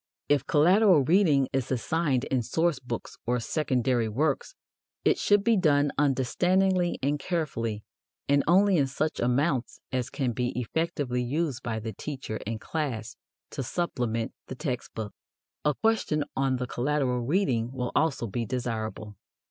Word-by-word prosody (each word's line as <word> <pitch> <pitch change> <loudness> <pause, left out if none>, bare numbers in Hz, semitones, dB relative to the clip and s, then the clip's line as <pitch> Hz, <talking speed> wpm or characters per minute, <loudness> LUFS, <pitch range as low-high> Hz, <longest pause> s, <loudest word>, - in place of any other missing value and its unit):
If 145 -3 +2
collateral 180 +1 +5
reading 150 -4 +4
is 135 -1 -1
assigned 135 +1 0
in 130 -2 0
source 160 +5 0
books 120 -2 -6
or 125 +1 +1
secondary 125 -4 0
works, 145 - -1 0.5
it - - +3
should 205 -1 +3
be 230 +1 +4
done 145 -6 +3
understandingly 175 +7 +2
and 145 +2 +1
carefully, 115 - -2 0.4
and 140 0 +3
only 190 +2 +5
in 140 -3 +3
such 155 +4 -2
amounts 130 +1 0
as 130 -1 -1
can 130 -4 -1
be 125 +1 -2
effectively 135 -1 -1
used 135 +1 -1
by 115 -3 -3
the 110 0 -5
teacher 130 -2 -5
and 110 0 -3
class 120 -7 -3 0.4
to 140 - -4
supplement 120 -6 -2
the 130 - -6
text 130 -3 -4
book. 110 -2 -5 0.5
A 150 -1 +2
question 220 -9 +1
on 135 -1 +1
the 125 0 -2
collateral 125 0 0
reading 125 - +1
will 125 -2 -3
also 145 -5 +1
be 115 +2 -2
desirable. 110 -4 -4
135 Hz, 150 wpm, -27 LUFS, 120-160 Hz, 0.5 s, collateral